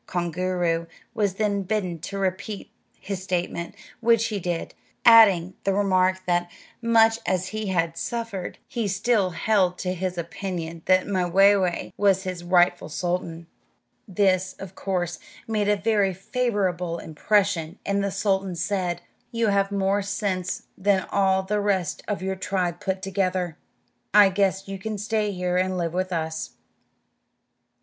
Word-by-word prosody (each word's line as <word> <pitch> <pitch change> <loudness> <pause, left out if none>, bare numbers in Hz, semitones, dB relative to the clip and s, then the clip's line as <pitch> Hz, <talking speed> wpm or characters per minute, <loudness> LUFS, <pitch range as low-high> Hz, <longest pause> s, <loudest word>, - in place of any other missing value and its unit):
Koongooroo 175 -1 -1 0.3
was 200 -3 0
then 205 -1 0
bidden 185 -4 -2
to 200 +5 -6
repeat 195 +2 -3 0.3
his 195 -2 -5
statement, 175 -2 -3 0.2
which 230 -1 +3
he 210 -2 -2
did, 175 -2 -3 0.3
adding 200 -6 +7
the 195 -1 +1
remark 185 -2 +2
that, 175 0 +1 0.3
much 225 -1 +4
as 185 0 0
he 215 -1 -4
had 170 -3 0
suffered, 230 -1 -4
he 230 -3 -2
still 200 0 +1
held 185 -1 +1
to 180 -1 -2
his 185 0 -3
opinion 170 -1 -5
that 185 0 +4
Mwayway 190 -1 +2
was 195 -2 +3
his 185 -2 -5
rightful 175 -2 +3
sultan. 170 +1 -3 0.6
This, 190 -1 +1
of 195 -1 -9
course, 180 -3 -2 0.3
made 210 -2 0
a 210 - +4
very 200 -2 +1
favorable 190 -5 -1
impression, 175 +1 0
and 200 0 0
the 200 - 0
sultan 195 -1 0
said, 180 0 -1 0.3
"You 230 -2 +1
have 200 0 +2
more 200 0 +1
sense 195 -2 -2
than 195 -1 +1
all 190 -1 +2
the 210 +2 -1
rest 190 -5 0
of 205 -3 -2
your 190 0 -1
tribe 180 -2 -2
put 190 0 -3
together; 185 -3 -1 0.6
I 205 -2 +8
guess 195 0 0
you 195 0 -5
can 215 +2 -4
stay 210 0 -1
here 180 -1 -1
and 185 0 0
live 170 -2 -2
with 185 +1 -1
us." 160 -2 -3
190 Hz, 145 wpm, -25 LUFS, 180-200 Hz, 0.6 s, I